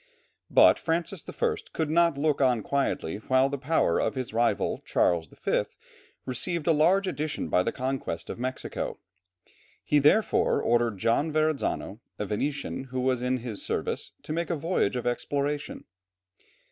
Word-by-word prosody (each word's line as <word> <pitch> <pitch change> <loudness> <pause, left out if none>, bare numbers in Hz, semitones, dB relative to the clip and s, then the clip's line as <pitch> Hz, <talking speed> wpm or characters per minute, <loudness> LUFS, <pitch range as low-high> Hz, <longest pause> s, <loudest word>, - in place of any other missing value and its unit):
But - - +6
Francis 170 +2 -2
I. - - 0 0.2
could 160 -2 -1
not 170 -2 +3
look 145 0 +1
on 125 -5 +3
quietly 135 -11 -1
while 130 +5 +2
the 140 0 -4
power 130 - +2
of - - -1
his 130 -4 -4
rival 115 +1 +1
Charles 85 -2 +1
V. - - -1 0.6
received 150 +6 -1
a 170 - +4
large 175 +6 +4
addition 155 -5 -3
by 90 - +3
the 115 - -1
conquest 130 -10 -3
of - - -6
Mexico. 130 +1 -4 0.9
He 150 - +3
therefore 150 +10 +3
ordered 120 -3 +1
John 115 +10 +1
Verrazzano, 155 -8 -1 0.2
a 105 - -3
Venetian 135 +6 -3
who 130 -1 -3
was 130 -1 +1
in 125 +1 0
his 110 -5 -4
service, - - -3
to 155 - -4
make 170 +1 -2
a 170 - 0
voyage 160 - 0
of 125 - -3
exploration. 140 +4 -2
135 Hz, 155 wpm, -27 LUFS, 120-155 Hz, 0.9 s, But